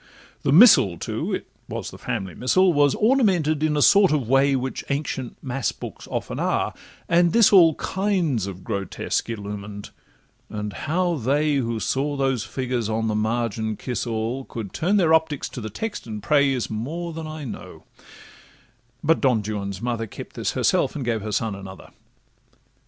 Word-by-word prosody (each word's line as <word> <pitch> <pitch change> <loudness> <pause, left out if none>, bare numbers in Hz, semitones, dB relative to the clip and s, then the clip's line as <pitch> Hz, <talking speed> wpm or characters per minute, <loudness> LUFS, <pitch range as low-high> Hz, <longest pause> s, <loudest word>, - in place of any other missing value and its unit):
The - - 0
Missal 155 - +7
too - - -3
(it - - -3 0.2
was - - -5
the - - -12
family 100 -8 -4
Missal) 180 - +3
Was 145 -2 +3
ornamented 190 - +2
in 155 -1 +1
a 145 - +4
sort 200 -3 +6
of 145 -7 0
way 135 +2 +4
Which 130 0 -3
ancient 140 -3 -3
mass 135 -1 -1
books - - -9
often - - -4
are, - - 0 0.3
and 170 0 +3
this 230 -3 +5
all 165 -5 +7
Kinds 180 - -1
of 95 -1 -8
grotesques 100 +1 -3
illumined; 100 -1 -6 0.6
and 105 -1 -5
how 175 - 0
they, 145 +4 +1
Who 115 -3 -1
saw 145 +5 -1
those 135 -5 0
figures 125 -4 -3
on 110 0 -1
the - - 0
margin 110 0 -1
kiss 125 -1 -3
all, 115 +3 -2
Could 110 -5 -7
turn 190 +6 +1
their 165 -5 +3
optics 160 -3 +1
to 125 - -7
the 110 - -5
text 210 - -5
and 105 -2 -6
pray, 140 +4 +3
Is 125 -3 -1
more 160 +11 -4
than 160 0 -6
I 155 -1 -7
know—But 120 +3 -7
Don 125 -6 +2
Juan's 100 -1 -4
mother 115 -2 -2
Kept - - -10
this - - -2
herself, - - +1
and 140 -4 -4
gave 115 -2 -1
her 105 +1 -5
son 110 +1 -1
another. 95 -1 -10
130 Hz, 170 wpm, -23 LUFS, 110-155 Hz, 0.6 s, Missal